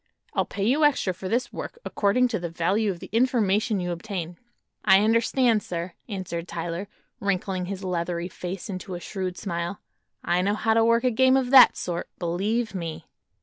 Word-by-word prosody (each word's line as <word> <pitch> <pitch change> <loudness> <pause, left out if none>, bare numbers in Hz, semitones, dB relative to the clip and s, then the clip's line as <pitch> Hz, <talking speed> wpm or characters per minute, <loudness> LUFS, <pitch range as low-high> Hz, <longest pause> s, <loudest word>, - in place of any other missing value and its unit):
I'll - - +1
pay 200 - -3
you 275 +7 +3
extra 275 -10 +3
for 185 +1 -6
this 240 +3 -1
work, - - -6
according 220 +5 +2
to 220 - -1
the 170 0 -4
value 190 +6 +1
of 180 -3 -4
the - - -9
information 220 -3 +2
you 180 -1 -2
obtain." 175 -1 -5 0.4
"I 190 -1 +6
understand, 230 +1 +3
sir," 170 -1 -5 0.2
answered 180 -4 -4
Tyler, 170 +3 -4 0.3
wrinkling 190 -2 -1
his 195 0 -5
leathery 175 -1 -2
face 180 0 -6
into 185 -1 -5
a - - -5
shrewd 185 0 -4
smile; 175 -1 -3 0.4
"I 175 +1 +1
know 200 +3 +1
how 220 +1 +1
to 225 0 +4
work 230 +1 +3
a 255 - +3
game 260 +3 +4
of 260 -1 -1
that 270 - +8
sort, 175 -1 -4
believe 205 +6 -1
me." 165 -3 -5
195 Hz, 185 wpm, -25 LUFS, 175-225 Hz, 0.4 s, that